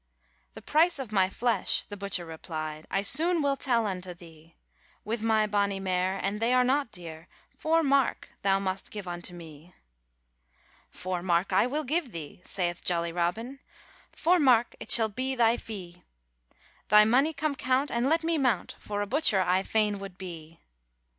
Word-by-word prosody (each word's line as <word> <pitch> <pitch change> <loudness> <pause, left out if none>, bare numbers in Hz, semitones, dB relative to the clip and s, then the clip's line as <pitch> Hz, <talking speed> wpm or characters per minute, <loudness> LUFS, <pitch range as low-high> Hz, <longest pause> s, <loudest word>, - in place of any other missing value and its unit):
'The - - -10
price 330 +2 +3
of 260 -6 -5
my 190 -3 +3
flesh,' 235 +4 0
the 205 - -9
butcher 200 -3 -2
repli'd, 155 -1 -6
'I 195 - 0
soon 330 - +3
will 280 -2 +1
tell 240 -5 +1
unto 185 -3 -4
thee; 165 -1 -16 0.5
With 225 +1 -3
my 220 -1 +2
bonny 200 -2 0
mare, 185 0 -1
and 200 +2 -1
they 230 +2 +1
are 250 - +5
not 265 -1 +1
dear, 170 -3 -9 0.3
Four 325 +1 +1
mark 275 -2 +1
thou 195 -1 +3
must 195 0 -3
give 205 -3 -7
unto 175 0 -5
me.' 165 0 -13 1.1
'Four 185 -1 -4
mark 175 +1 0
I 200 +5 +4
will 295 +4 -2
give 295 -2 -1
thee,' 160 +1 -8
saith 175 -2 -3
jolly 170 -1 0
Robin, 215 +10 -2 0.5
'Four 355 +2 +2
mark 245 -5 +4
it - - -9
shall 225 -2 +7
be 255 +5 -3
thy 230 -1 +4
fee; 180 -7 -9 0.9
Tby 210 +1 +7
mony 265 +7 +3
come 310 -1 -2
count, 265 +1 0
and 240 +3 +1
let 325 +1 +2
me 330 -1 +1
mount, 255 -4 0
For 205 0 -3
a - - -3
butcher 225 -5 +2
I 185 +1 +2
fain 210 0 0
would 195 -2 -9
be.' 165 -3 -9
205 Hz, 175 wpm, -28 LUFS, 180-255 Hz, 1.1 s, shall